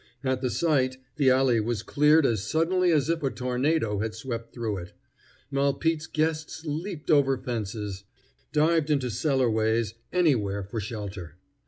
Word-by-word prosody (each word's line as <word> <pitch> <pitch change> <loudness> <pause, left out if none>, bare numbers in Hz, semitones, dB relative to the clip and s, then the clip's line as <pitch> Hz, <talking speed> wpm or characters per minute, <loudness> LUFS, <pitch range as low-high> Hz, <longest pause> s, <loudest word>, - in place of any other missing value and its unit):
At 130 -1 0
the 130 - 0
sight 130 -3 +1 0.2
the 140 -3 +4
alley 130 -2 +4
was 110 0 -2
cleared 150 +3 +4
as 110 -6 +1
suddenly 175 +7 +2
as 150 -4 +2
if 165 0 0
a 135 - +1
tornado 125 -3 0
had 110 +1 -3
swept 115 0 -5
through 115 -4 -3
it. 90 0 -8 0.6
Malpete's 140 +3 0
guests 155 0 -2
leaped 160 +2 -3
over 135 -3 +4
fences, 105 -5 -4 0.5
dived 155 0 +2
into 135 -5 +1
cellarways, 115 -4 +1 0.2
anywhere 115 - +1
for 100 +4 -5
shelter. 100 -6 -6
130 Hz, 145 wpm, -27 LUFS, 110-155 Hz, 0.6 s, the